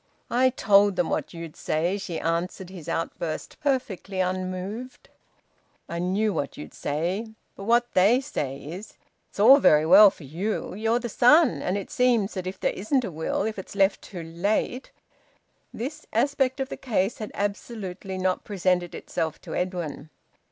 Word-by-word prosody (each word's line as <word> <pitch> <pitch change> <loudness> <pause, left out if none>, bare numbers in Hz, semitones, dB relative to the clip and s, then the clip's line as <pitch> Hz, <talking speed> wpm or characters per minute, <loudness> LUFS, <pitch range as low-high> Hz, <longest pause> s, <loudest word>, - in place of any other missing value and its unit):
"I 255 +2 +4
told 205 -5 +4
them 175 - 0
what - - -2
you'd 165 -2 -8
say," 175 +6 -1
she 175 -4 -4
answered 175 +2 -2
his 175 -5 -9
outburst, 165 -1 -4
perfectly 250 - -2
unmoved. 185 +6 -3 0.8
"I 170 - -4
knew 195 +4 +1
what 140 - -3
you'd 150 - -9
say. 175 +9 -2 0.3
But 195 - -8
what 240 +2 +2
they 205 +7 +5
say 145 - -4
is 180 +8 -9 0.3
it's - - -14
all 260 +7 +8
very 155 - +5
well 195 +5 +9
for 175 - -14
you. 180 +12 -3
You're 225 +4 +1
the 245 0 -3
son, 250 +5 +5
and 185 +2 -1
it 200 - -6
seems 235 -5 +2
that 185 -2 -4
if 185 +1 -6
there - - 0
isn't 245 +6 0
a 195 - -5
will, 160 0 -2
if 215 -2 -3
it's 190 - -9
left 195 0 +3
too 175 -4 -8
late 200 +9 -1 0.4
" - - -39 0.3
This 300 +6 -6
aspect 265 +2 +1
of 265 0 -2
the - - -6
case 210 -4 -1
had 215 - -5
absolutely 200 -2 -4
not 185 0 0
presented 180 -3 0
itself 160 -1 -3
to - - -8
Edwin. 175 -5 -3
195 Hz, 170 wpm, -26 LUFS, 175-230 Hz, 0.8 s, well